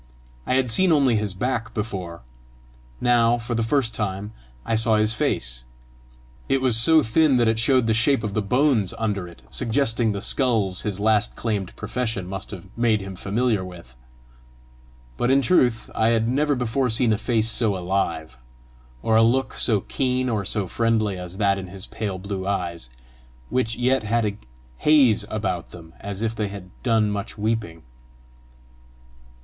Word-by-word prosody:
I 130 - +2
had 130 -3 +2
seen 180 +10 +4
only 140 -6 +4
his 105 -3 -2
back 115 +1 -2
before; 95 -6 -4 0.8
now 120 -1 +3
for 120 +1 -5
the 115 - 0
first 115 0 0
time 105 0 -4 0.3
I 115 - -1
saw 110 0 +4
his 110 +1 +2
face. 60 - -2 0.9
It 135 0 +3
was 130 -3 +3
so 155 +7 +5
thin 135 +4 +3
that 120 -1 +3
it 110 0 +1
showed 130 +1 +3
the 110 - +2
shape 115 +2 +2
of 105 -2 -3
the 110 - 0
bones 120 -2 +1
under 100 -5 -2
it, 75 -8 -15
suggesting 115 -2 0
the 100 - -3
skulls 110 -5 +1
his 100 -2 -4
last 105 0 +1
claimed 105 -5 -3
profession 115 -7 -3
must 95 +2 -6
have 95 -4 -8
made 115 -2 +2
him 95 -1 -7
familiar 105 +2 0
with. 85 -9 -11 1.2
But 120 - 0
in 135 +1 +5
truth 125 -7 +2
I 110 - +2
had 115 -1 +2
never 145 +4 +1
before 125 +1 0
seen 110 0 +2
a - - 0
face 115 -2 0
so 110 -5 0
alive, 90 -6 -2 0.7
or 110 - +2
a 110 - +6
look 125 +4 +2
so 110 -5 +2
keen 130 +1 -1
or 110 -3 -1
so 100 +1 -1
friendly 110 -2 0
as 90 +1 -8
that 100 -2 +2
in 95 - -7
his 95 +1 -7
pale 100 -4 -4
blue 95 0 -5
eyes, 85 -8 -3 0.6
which 115 -3 0
yet 125 +1 +1
had 115 +1 0
a 100 -1 -2 0.4
haze 130 -9 +4
about 95 -5 -3
them 80 -2 -13
as 100 +1 -5
if 115 0 -1
they 105 -2 -2
had 100 -2 -9
done 110 -4 +2
much 100 +1 -5
weeping. 105 -7 -2
110 Hz, 170 wpm, -23 LUFS, 100-120 Hz, 1.2 s, a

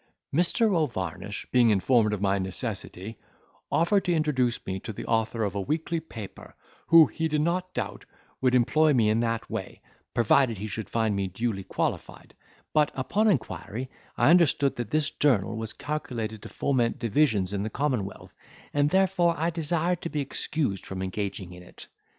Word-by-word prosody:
"Mr. 185 - +3
O'Varnish, 105 - -2
being 120 -2 +5
informed 105 +2 +3
of 105 - -2
my 100 0 +1
necessity, 95 +1 -5 0.5
offered 190 +4 +3
to 180 - 0
introduce 140 -7 +1
me 95 0 -3
to 110 - -6
the 105 - -7
author 115 0 0
of 100 -3 -1
a 100 - -2
weekly 160 - -1
paper, 115 -11 -10 0.3
who, 165 -1 +8
he 160 +2 -2
did 150 -1 0
not 180 +3 -1
doubt, - - -4 0.4
would 130 -1 +3
employ 150 +5 +4
me 110 -3 +3
in 110 - +2
that 115 -1 -1
way, - - -5 0.4
provided 125 -2 +3
he 100 - -5
should 110 +1 -5
find 110 -3 +1
me 100 -1 -1
duly 100 0 -3
qualified; - - -4 0.4
but, 150 -2 +4
upon 205 +12 +1
inquiry, 130 - -2 0.3
I - - +5
understood 145 -5 +4
that 120 -4 -4
this 155 +3 +1
journal 115 -7 +1
was 110 -1 -4
calculated 115 -8 -4
to - - -9
foment 120 -4 0
divisions 110 -5 +1
in 100 - -1
the 110 - -2
commonwealth, 125 -6 -3 0.4
and 145 0 +3
therefore 180 -2 +3
I 165 +2 0
desired 170 +2 0
to 170 - -4
be 150 - -3
excused 140 - -2
from 95 0 -5
engaging 95 -1 -4
in 90 - -11
it. 90 - -13
120 Hz, 170 wpm, -27 LUFS, 105-155 Hz, 0.5 s, who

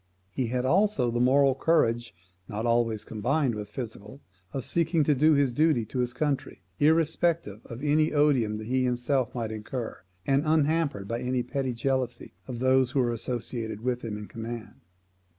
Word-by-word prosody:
He 125 +5 -1
had 125 +2 -1
also 175 - +2
the 120 - -1
moral 135 +2 +4
courage, 120 - +1 0.3
not 105 +3 -3
always 115 -2 +1
combined 125 +5 0
with 105 -1 -6
physical 110 +1 -7 0.3
of 135 - -4
seeking 165 -1 +1
to 150 - +3
do 155 +3 +4
his 140 -4 +2
duty 150 -5 +2
to 125 +4 -5
his 125 -1 0
country, 140 -6 -2 0.2
irrespectively 160 - +2
of 120 +4 -8
any 155 +1 +3
odium 135 -8 +2
that 110 - -7
he 130 +3 +1
himself 125 +1 0
might 115 -3 -2
incur, 110 +2 -5 0.2
and 135 0 +3
unhampered 155 -8 +1
by 115 +2 -2
any 125 0 -1
petty 135 -2 -2
jealousy 130 -2 -2
of 125 - -5
those 130 0 +3
who 135 - 0
were 120 -2 +2
associated 115 -2 -4
with 125 0 -1
him 110 -3 -4
in 105 - -7
command. 115 0 -7
125 Hz, 170 wpm, -27 LUFS, 115-145 Hz, 0.3 s, moral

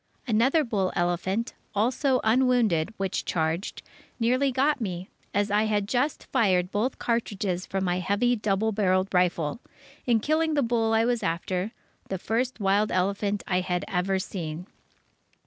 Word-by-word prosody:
Another 260 +7 +3
bull 200 -7 -1
elephant, 180 +6 -1 0.2
also 255 +4 +2
unwounded, 225 -7 +3
which 195 -1 -2
charged, 160 +2 -2 0.4
nearly 255 +4 +2
got 275 +2 +1
me, 185 -3 -4 0.2
as 205 0 0
I 210 +1 +3
had 205 -2 0
just 260 +6 0
fired 185 -4 +2
both 225 +6 -1
cartridges 205 -6 -2
from 195 0 -2
my 180 -1 0
heavy 210 +7 +1
double 215 0 0
barreled 190 -2 +1
rifle, 175 -2 +1 0.5
in 235 -2 +4
killing 310 +5 +1
the 285 - +2
bull 230 -1 +1
I 225 +1 +3
was 240 -1 +1
after 180 +4 -2 0.4
the 190 - -2
first 235 +7 -1
wild 205 +1 +2
elephant 200 +2 0
I 180 -1 +1
had 180 -1 -2
ever 190 +1 0
seen. 175 -3 -5
205 Hz, 145 wpm, -26 LUFS, 185-235 Hz, 0.5 s, in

